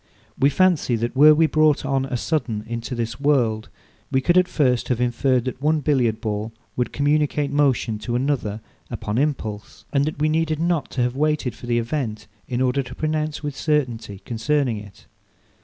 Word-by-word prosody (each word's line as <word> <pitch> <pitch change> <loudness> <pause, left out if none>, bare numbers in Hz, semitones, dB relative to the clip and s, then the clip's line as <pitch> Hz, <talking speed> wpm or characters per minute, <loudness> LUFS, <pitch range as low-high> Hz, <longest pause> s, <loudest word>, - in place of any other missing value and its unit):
We 135 +2 +3
fancy, 170 -6 +2
that 120 +2 -2
were 150 +3 +8
we 160 +1 +4
brought 155 -2 +3
on 135 -1 0
a 130 -2 -2
sudden 120 -7 -2
into 115 +2 -4
this 115 +1 -3
world, 120 -7 +1 0.4
we 130 - +3
could 175 +6 +2
at 180 0 +5
first 125 -8 +1
have 125 -2 0
inferred 125 +1 +1
that 130 0 -4
one 155 +1 +2
Billiard 125 -7 +1
ball 110 0 -3 0.2
would 125 - -1
communicate 145 0 +1
motion 135 -6 +1
to 120 +3 -3
another 120 -5 -1 0.3
upon 105 +3 -2
impulse; 110 -8 -3
and 140 0 +3
that 155 - -3
we 150 +1 +1
needed 155 0 0
not 170 -3 0
to 125 - +1
have 125 +1 -1
waited 150 -3 0
for 120 - -11
the 120 -1 +1
event, 115 -3 -2 0.2
in 125 0 -2
order 130 +2 +2
to 125 - -9
pronounce 155 0 -2
with 145 -2 -4
certainty 125 -10 -1
concerning 125 +1 0
it. 105 -1 -14
135 Hz, 185 wpm, -22 LUFS, 120-150 Hz, 0.4 s, were